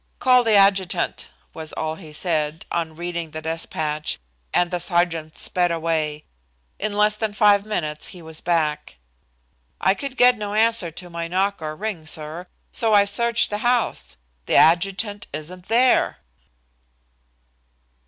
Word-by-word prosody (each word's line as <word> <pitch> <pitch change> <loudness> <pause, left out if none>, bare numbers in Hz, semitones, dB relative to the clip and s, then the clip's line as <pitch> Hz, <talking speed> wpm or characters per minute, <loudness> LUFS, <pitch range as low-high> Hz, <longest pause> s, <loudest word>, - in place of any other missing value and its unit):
"Call 250 -1 +4
the 225 -2 +3
adjutant," 195 -2 +2 0.2
was 160 -1 -8
all 155 0 -2
he 160 -2 -11
said, 155 -1 -1
on 165 -2 -2
reading 170 -1 -4
the 155 +1 -7
despatch, 155 -1 -2 0.3
and 175 0 +2
the 180 - -1
sergeant 170 -3 0
sped 175 -1 +1
away. 160 -2 -1 0.5
In 215 0 -1
less 210 0 +4
than 215 -1 -2
five 205 -1 +4
minutes 155 -8 -2
he 180 - -9
was 160 0 -5
back. 155 - -1 0.8
"I 190 - +3
could 270 +4 -6
get 245 -2 +5
no 205 0 -4
answer 225 -5 +2
to 175 +3 -9
my 170 0 -4
knock 195 +3 0
or 155 0 -4
ring, 190 -5 -5
sir, 160 +3 -4 0.2
so 220 -2 +2
I 200 0 +6
searched 235 +3 +1
the 210 - -2
house. 240 - 0 0.3
The - - +1
adjutant 195 +5 +3
isn't 175 +5 -4
there!" 245 +3 +3
175 Hz, 145 wpm, -22 LUFS, 160-210 Hz, 0.8 s, I